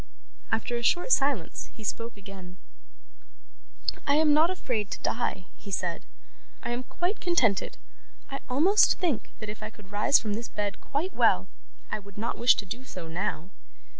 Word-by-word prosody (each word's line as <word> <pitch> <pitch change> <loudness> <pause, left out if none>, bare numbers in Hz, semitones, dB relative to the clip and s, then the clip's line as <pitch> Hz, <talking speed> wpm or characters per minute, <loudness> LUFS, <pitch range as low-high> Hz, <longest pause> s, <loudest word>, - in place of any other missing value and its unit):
After 240 - 0
a - - -3
short 355 - +2
silence, 270 - +2
he 220 - -10
spoke 230 +1 -3
again. 190 -3 -10 1.5
'I 285 - +4
am 305 -1 +5
not 315 +3 +5
afraid 245 - -1
to - - -4
die,' 215 -6 -1
he - - -11
said. 175 -3 -2 0.6
'I 235 - -3
am 240 +1 -1
quite 360 +4 -2
contented. 255 - +2 0.5
I 275 - -3
almost 340 +11 +5
think 325 - 0
that 215 - -7
if 210 +1 -6
I 215 - -4
could 210 -2 -16
rise 210 +7 +5
from 210 -2 -2
this 230 +3 -3
bed 205 -1 -3
quite 315 +7 -2
well - - +4 0.5
I - - -1
would 200 -1 -15
not 230 +3 -2
wish 240 +2 +7
to 205 - -3
do 235 +7 -6
so, 180 -10 -8
now. 175 +1 -3
230 Hz, 170 wpm, -28 LUFS, 200-285 Hz, 1.5 s, wish